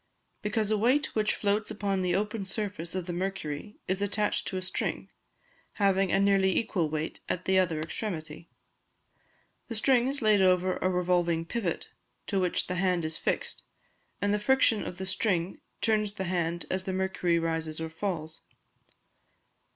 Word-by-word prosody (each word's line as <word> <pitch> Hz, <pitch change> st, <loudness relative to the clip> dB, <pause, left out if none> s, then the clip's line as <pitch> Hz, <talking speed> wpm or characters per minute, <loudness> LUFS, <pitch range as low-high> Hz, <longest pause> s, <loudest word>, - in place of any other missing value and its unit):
_ -, -, -44 dB
Because 210 Hz, 0 st, 0 dB
a 215 Hz, -, +2 dB
weight 255 Hz, +7 st, +2 dB
which 215 Hz, -1 st, +1 dB
floats 210 Hz, +1 st, 0 dB
upon 200 Hz, -2 st, -1 dB
the 180 Hz, -1 st, +1 dB
open 210 Hz, +1 st, -1 dB
surface 195 Hz, -4 st, -3 dB
of 185 Hz, -2 st, -2 dB
the 175 Hz, -, -4 dB
mercury 185 Hz, -1 st, -3 dB
is 185 Hz, +2 st, 0 dB
attached 205 Hz, +1 st, 0 dB
to 190 Hz, -, -2 dB
a -, -, -2 dB
string, 185 Hz, -, -3 dB, 0.6 s
having 195 Hz, -2 st, +2 dB
a 195 Hz, -, +3 dB
nearly 195 Hz, -1 st, +3 dB
equal 180 Hz, -8 st, +1 dB
weight 155 Hz, +1 st, -3 dB
at 180 Hz, -, -2 dB
the 190 Hz, 0 st, +4 dB
other 170 Hz, -4 st, +1 dB
extremity; 160 Hz, -2 st, -5 dB, 1.2 s
the 230 Hz, -, -4 dB
string 245 Hz, +2 st, +3 dB
is 275 Hz, -1 st, -2 dB
laid 210 Hz, -2 st, +5 dB
over 185 Hz, 0 st, +3 dB
a 185 Hz, -, +1 dB
revolving 175 Hz, -2 st, +1 dB
pivot, 185 Hz, -2 st, -2 dB, 0.4 s
to 195 Hz, -, 0 dB
which 180 Hz, -2 st, +1 dB
the 180 Hz, -, -3 dB
hand 180 Hz, -3 st, +1 dB
is 155 Hz, 0 st, -3 dB
fixed, -, -, -2 dB, 0.6 s
and 200 Hz, 0 st, +1 dB
the 210 Hz, -, +1 dB
friction 230 Hz, -1 st, +4 dB
of 180 Hz, -, -6 dB
the 190 Hz, -, -4 dB
string 185 Hz, -2 st, 0 dB, 0.2 s
turns 215 Hz, -2 st, +2 dB
the 190 Hz, -, -3 dB
hand 175 Hz, -2 st, -1 dB
as 185 Hz, 0 st, -1 dB
the 190 Hz, -, -2 dB
mercury 185 Hz, -2 st, +1 dB
rises 160 Hz, -1 st, -1 dB
or 160 Hz, 0 st, -4 dB
falls. 160 Hz, -3 st, -4 dB
190 Hz, 170 wpm, -29 LUFS, 170-210 Hz, 1.2 s, laid